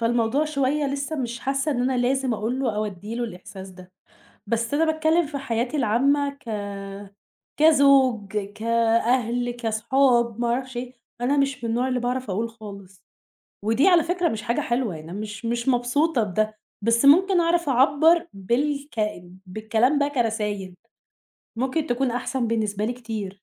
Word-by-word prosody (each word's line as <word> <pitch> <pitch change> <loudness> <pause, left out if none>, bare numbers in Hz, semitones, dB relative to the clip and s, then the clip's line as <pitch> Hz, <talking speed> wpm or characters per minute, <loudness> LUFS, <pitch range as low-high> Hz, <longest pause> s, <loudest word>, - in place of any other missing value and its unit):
فالموضوع 235 +5 +1
شوية 285 0 0
لسّه 280 +3 -3
مش 240 -3 -4
حاسّة 275 +3 -1
إن 245 -3 -1
أنا 255 0 0
لازم 255 0 +1
أقول 230 +5 -2
له 230 -6 -1
أو 215 - 0
ادّي 205 +3 -7
له 240 0 -2
الإحساس 190 -2 -9
ده، 185 0 -15 0.6
بس 230 +4 -1
أنا 320 +3 +3
باتكلّم 315 +1 +2
في 285 -1 -5
حياتي 245 +2 -2
العامّة 275 +5 +2
ك 280 -4 -12 1.1
كزوج، 270 -9 +4
كأهل 230 +3 0
كصحاب 235 0 +1
ما 240 - +1
أعرفش 255 +1 -2
إيه، 250 +1 -5 0.3
أنا 280 +4 +1
مش 275 -2 0
من 230 - -2
النوع 245 +3 0
اللي 250 -1 0
باعرف 250 -1 -2
أقول 220 +5 -1
خالص، 200 -4 -12 0.6
ودي 225 - +3
على 350 -3 +5
فكرة 350 +1 0
مش 220 -1 -4
حاجة 235 +2 -1
حلوة 235 -7 -1
يعني 155 +2 -10
أنا 200 - -5
مش 215 +2 -7
مش 235 +2 -2
مبسوطة 250 +2 +1
بده، 215 +2 -1 0.3
بس 230 +4 +2
ممكن 365 +5 +6
أعرف 340 -2 +1
أعبّر 290 +7 +4
بالك 275 +7 -2 0.5
بالكلام 220 +8 +1
ده 285 - +2
كرسايل، 210 -8 -2 0.8
ممكن 265 +6 -1
تكون 245 +1 0
أحسن 250 0 -2
بالنسبة 215 -2 -1
لي 240 - -2
كتير. 225 -5 -5
245 Hz, 160 wpm, -24 LUFS, 220-275 Hz, 1.1 s, ممكن